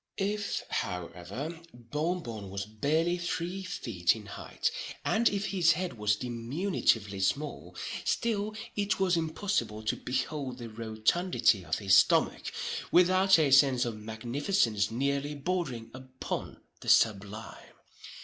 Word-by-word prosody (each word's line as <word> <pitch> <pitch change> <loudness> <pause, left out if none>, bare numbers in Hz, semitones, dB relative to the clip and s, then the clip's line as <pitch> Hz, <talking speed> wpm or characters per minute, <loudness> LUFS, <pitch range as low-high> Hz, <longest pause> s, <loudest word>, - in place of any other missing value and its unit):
If, 205 +1 -1
however, 100 - -4
Bon 150 +9 -2
Bon 110 -4 -6
was 100 +1 -4
barely 155 +11 0
three 175 +2 -3
feet 105 - 0
in 110 -2 -9
height, 100 - -3 0.3
and 230 +1 +3
if 200 0 -2
his 175 -4 +4
head 180 -1 -3
was 105 -1 +1
diminutively 115 - 0
small, 145 +10 -2 0.3
still 215 -2 0 0.2
it 205 -1 0
was 185 -2 +3
impossible 160 - -1
to 110 - 0
behold 130 0 -3
the 120 -2 -7
rotundity 110 - +1
of 80 -1 -1
his 95 -2 +4
stomach - - +3 0.4
without 185 +2 +6
a 150 -4 +3
sense 135 -2 +5
of 115 -2 -3
magnificence 115 - 0
nearly 140 +4 -1
bordering 140 -8 -3
upon 130 0 -6 0.2
the - - -5
sublime. 105 0 +1
130 Hz, 125 wpm, -30 LUFS, 110-175 Hz, 0.4 s, without